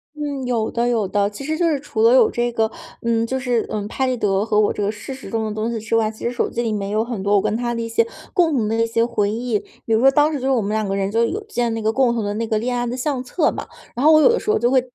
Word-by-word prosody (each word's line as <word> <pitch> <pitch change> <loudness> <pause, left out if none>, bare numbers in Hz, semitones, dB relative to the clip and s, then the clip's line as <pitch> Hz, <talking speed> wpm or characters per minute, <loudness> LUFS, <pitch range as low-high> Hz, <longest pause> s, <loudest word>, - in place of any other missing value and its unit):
嗯， 285 -3 -4
有 230 -3 0
的 235 +1 0
有 225 -4 +1
的， 200 +1 +1
其 210 +7 -9
实 310 +3 -2
就 345 0 +2
是 295 -3 0
除 300 +10 -4
了 460 +2 +6
有 460 -3 +5
这 240 0 -1
个 225 -1 0 0.3
嗯， 230 -1 +1
就 265 +2 -2
是 245 -3 0
嗯， 205 -1 -3
拍 265 +4 -1
立 255 -1 0
得 200 -2 +1
和 215 -1 +2
我 210 - +2
这 - - -4
个 205 - 0
事 210 +5 -8
实 265 - -10
中 225 -1 -1
的 215 - -3
东 220 +1 -2
西 235 -1 -3
之 220 +1 -2
外， 220 -1 +2
其 220 - -11
实 235 - 0
手 245 - -1
机 240 - -2
里 225 - -1
面 200 -2 -2
也 205 - -4
有 220 +1 +2
很 235 -5 -5
多 200 +1 +2
我 200 - +4
跟 210 - -1
他 240 +1 -1
的 230 - -2
一 230 - -3
些 230 0 +1 0.3
共 340 -5 +3
同 225 -5 +1
的 220 - 0
一 230 - +2
些 230 0 +1
回 215 -4 0
忆。 230 -2 -1 0.3
比 225 - 0
如 220 - +4
说 270 - +7
当 295 +3 +3
时 290 - -2
就 260 - -5
是 - - +2
我 250 -4 +2
们 205 +1 -2
两 215 -1 0
个 195 - -1
人 195 0 -1
就 230 +2 +2
有 405 - -2
建 245 - -1
那 225 - -3
个 220 - +2
共 245 -2 +2
同 225 - -1
的 205 0 -2
那 225 +1 -2
个 220 - 0
恋 245 +3 -1
爱 245 0 -1
的 245 - -3
相 260 -1 -2
册 280 +7 +1
嘛， - - -6 0.3
然 250 - -2
后 310 - +7
我 310 - +7
有 - - +7
的 470 - +2
时 - - -5
候 435 - +4
就 240 +1 +1
会 260 -1 +4
235 Hz, 375 characters per minute, -21 LUFS, 215-260 Hz, 0.3 s, 说